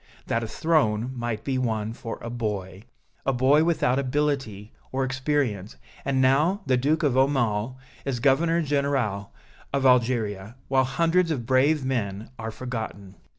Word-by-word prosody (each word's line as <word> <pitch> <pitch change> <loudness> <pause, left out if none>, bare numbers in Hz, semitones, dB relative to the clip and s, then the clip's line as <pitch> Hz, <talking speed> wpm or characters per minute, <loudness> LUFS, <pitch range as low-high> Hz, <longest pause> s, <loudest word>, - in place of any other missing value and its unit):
that 115 - 0
a - - -3
throne 125 -6 +1
might 120 -3 -3
be 130 -2 -1
won 110 -3 -1
for 115 -1 -6
a 115 - -4
boy 100 -5 -4 0.4
a 135 - +1
boy 135 +4 +4
without 155 -6 +2
ability, 135 -7 -2 0.2
or 135 +1 0
experience, 130 - -1 0.3
and 135 -1 0
now 150 +10 +3
the 130 - +3
Duke 150 +6 +1
of 140 -4 +2
Aumale 130 -4 +1 0.3
is 135 -3 -2
Governor 165 +6 +3
General 135 -9 -1 0.4
of 140 -1 0
Algeria, 115 -5 +2
while 130 -1 +3
hundreds 170 +6 +2
of 135 -8 -2
brave 135 +3 +3
men 110 -4 -2
are 110 0 -4
forgotten." 110 -5 -6
130 Hz, 150 wpm, -25 LUFS, 110-140 Hz, 0.4 s, boy